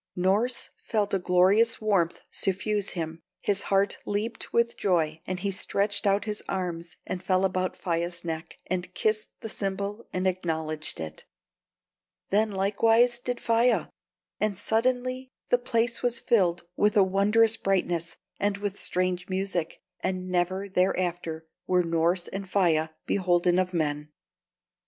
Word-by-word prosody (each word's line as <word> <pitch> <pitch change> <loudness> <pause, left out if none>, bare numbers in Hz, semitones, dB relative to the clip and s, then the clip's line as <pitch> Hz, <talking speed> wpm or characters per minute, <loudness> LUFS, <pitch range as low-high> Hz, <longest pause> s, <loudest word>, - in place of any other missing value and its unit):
Norss 205 +7 +1
felt 210 -3 -1
a 195 - +3
glorious 190 +6 +4
warmth 195 -6 +1
suffuse 200 +1 0
him, 165 -1 -4 0.2
his 200 -1 0
heart 195 0 +2
leaped 215 +3 -3
with 235 0 +2
joy, 160 -5 +1
and 185 -1 -3
he 200 0 0
stretched 200 +2 0
out 200 +2 +2
his 210 -1 -3
arms 170 -3 -3
and 180 - -4
fell 185 0 +2
about 185 -1 -1
Faia's 170 0 -2
neck, 160 -1 -5
and 180 0 -3
kissed 215 +1 0
the - - -4
symbol 200 +1 -3
and 185 +1 -2
acknowledged 160 -4 -2
it. 80 -1 -7 1.1
Then 215 +2 +3
likewise 225 +5 +3
did 245 0 -3
Faia; 235 +1 +2 0.5
and 210 -3 0
suddenly 255 +4 0 0.2
the 245 - +4
place 235 -1 0
was 240 -1 +1
filled 185 -9 +2
with 210 0 +3
a 200 - +8
wondrous 210 +4 +3
brightness 175 -4 -1 0.2
and 200 0 +1
with 205 -1 -4
strange 180 0 -1
music, 185 -3 -2 0.2
and 185 -1 -2
never 185 +2 0
thereafter 175 -3 0 0.2
were 180 -1 +3
Norss 170 +2 +1
and 195 -1 -6
Faia 165 -5 +2 0.2
beholden 180 -2 +2
of 185 -1 0
men. 150 -3 -1
190 Hz, 140 wpm, -27 LUFS, 175-210 Hz, 1.1 s, a